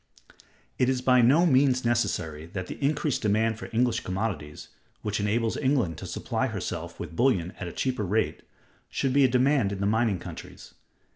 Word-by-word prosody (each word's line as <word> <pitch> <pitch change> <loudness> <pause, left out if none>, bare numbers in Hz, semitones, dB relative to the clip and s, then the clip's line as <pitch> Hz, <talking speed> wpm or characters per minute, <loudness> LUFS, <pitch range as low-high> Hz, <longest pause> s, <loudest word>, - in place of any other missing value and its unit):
It 125 - +3
is 130 -1 +1
by 125 0 +4
no 140 +9 +5
means 130 -4 +3
necessary 90 -10 -1
that 95 -2 -3
the 115 - -8
increased 145 -1 0
demand 110 +1 +1
for - - -7
English 115 0 +1
commodities, 95 -6 -4 0.3
which 105 0 -2
enables 110 +2 0
England 130 - 0
to - - -7
supply - - -2
herself - - -5
with - - -7
bullion 95 -8 +2
at 90 - -4
a - - -5
cheaper 125 0 -2
rate, 100 -5 0 0.5
should 135 -2 -1
be 140 0 +5
a - - +6
demand 130 -3 +2
in 100 - -4
the 100 - 0
mining 110 -1 +2
countries. - - -10
115 Hz, 175 wpm, -27 LUFS, 100-130 Hz, 0.5 s, a